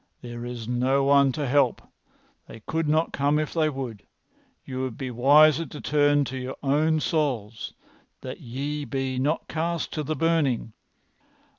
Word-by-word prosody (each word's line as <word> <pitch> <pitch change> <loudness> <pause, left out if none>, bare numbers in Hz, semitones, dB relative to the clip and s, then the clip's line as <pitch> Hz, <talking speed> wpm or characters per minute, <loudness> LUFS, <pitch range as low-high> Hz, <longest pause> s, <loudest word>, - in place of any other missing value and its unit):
"There 120 -1 -7
is 120 -2 -6
no 130 +3 +1
one 140 0 +5
to 150 +1 -2
help. 130 -2 +3 0.7
They 110 - -11
could 160 +7 -2
not 155 +2 +1
come 145 +2 +2
if 155 -1 -2
they 155 -2 +2
would. 130 -8 -6 0.6
You 130 -1 -4
would 130 -4 -4
be 130 -2 -4
wiser 150 +6 +5
to 150 - -9
turn 145 -1 +2
to 130 +1 -5
your 130 +1 -5
own 155 +3 +2
souls 125 - -2 0.5
that - - -7
ye 140 +5 -4
be 135 -2 -2
not 145 +5 0
cast 165 +1 -2
to 155 - -2
the 155 +1 -2
burning. 150 -9 +1
140 Hz, 160 wpm, -25 LUFS, 125-155 Hz, 0.7 s, one